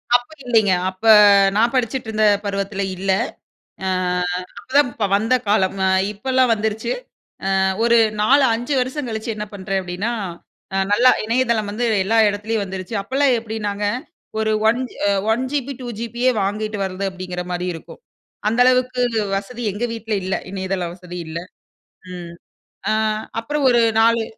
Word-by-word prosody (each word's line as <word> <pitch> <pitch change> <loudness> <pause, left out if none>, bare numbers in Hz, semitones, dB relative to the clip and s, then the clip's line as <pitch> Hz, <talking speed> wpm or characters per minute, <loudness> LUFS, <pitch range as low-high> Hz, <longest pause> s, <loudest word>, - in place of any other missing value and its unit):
அப்போ 245 +5 0
இல்லைங்க. 220 -5 +3 0.2
அப்ப 190 +4 -10 0.5
நான் 230 +4 +3
படிச்சுட்டுருந்த 225 -3 0 0.2
பருவத்தில 200 0 -2
இல்லை. 190 +1 +1 0.7
அ - - 0 0.7
அப்பதான் 275 -1 +2
ப் - - +1
வந்த 225 +5 +1
காலம். 195 -2 +2
அ - - +3 0.2
இப்பல்லாம் 255 +3 +1
வந்துருச்சு. 220 - -2 0.7
அ - - +3 0.2
ஒரு 235 0 +5 0.3
4 270 +6 +5
5 245 +5 -2
வருஷம் 255 +1 -3
கழிச்சு 220 +1 -4
என்ன 210 0 -4
பண்றேன் 195 0 -2
அப்படீன்னா, 185 +6 -3 0.6
அ - - +1 0.2
நல்லா 250 +4 +6
இணையதளம் 230 -3 +1
வந்து, 235 +3 -1 0.2
எல்லா 225 +3 +2
இடத்துலயும் 205 +1 -2
வந்துருச்சு. 190 +2 -5
அப்பல்லாம் 265 +2 +2
எப்படீன்னாங்க, 210 -2 -3 0.5
ஒரு 220 0 +1 0.2
ஒன் 240 +3 +2 0.3
அ - - +3 0.2
1 240 +3 0
ஜிபி 280 -1 -2
2 245 - -6
ஜிபியே, 235 +2 0
வாங்கிட்டு 210 +1 -2
வர்றது. 190 +1 -3
அப்படீங்கிற 180 -1 -5
மாரி 180 +1 -2
இருக்கும். 165 - -11 0.5
அந்த 230 +3 -1
அளவுக்கு 255 0 +2 0.3
வசதி 235 +5 -6
எங்க 210 +5 -3
வீட்ல 225 -1 -3
இல்ல. 190 +1 -1 0.2
இணையதள 190 -2 -2
வசதி 180 -1 -9
இல்ல. 160 +1 -4 0.8
ம். 175 -1 -8 0.6
அ - - +3 0.5
அப்புறம் 285 +4 -2
ஒரு 240 -1 +4 0.2
4 230 0 +4
220 Hz, 145 wpm, -20 LUFS, 195-245 Hz, 0.8 s, நல்லா